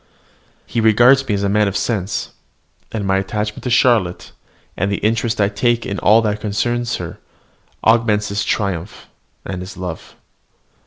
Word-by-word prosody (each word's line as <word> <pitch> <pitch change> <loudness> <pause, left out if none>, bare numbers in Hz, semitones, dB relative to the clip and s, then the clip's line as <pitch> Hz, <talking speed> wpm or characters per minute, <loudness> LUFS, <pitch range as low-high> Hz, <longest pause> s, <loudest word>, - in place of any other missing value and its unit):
He 115 - -2
regards 120 +5 +5
me 105 - +1
as 100 - -2
a - - +2
man 105 +1 +2
of 100 - -1
sense; 105 -4 -2 0.6
and 105 -3 -3
my 95 0 +2
attachment 105 +2 -3
to - - 0
Charlotte, 115 -7 +2 0.4
and 100 +3 -1
the - - +1
interest 110 +1 0
I 100 - +4
take 115 +3 0
in 100 - -3
all 110 +2 +5
that 105 -1 -1
concerns 120 +3 -1
her, 85 -2 -7 0.6
augment 110 -2 +3
his 100 0 -2
triumph 100 -2 -3 0.4
and 95 -1 -5
his 95 +1 -9
love. 90 -3 -7
105 Hz, 160 wpm, -19 LUFS, 100-115 Hz, 0.6 s, regards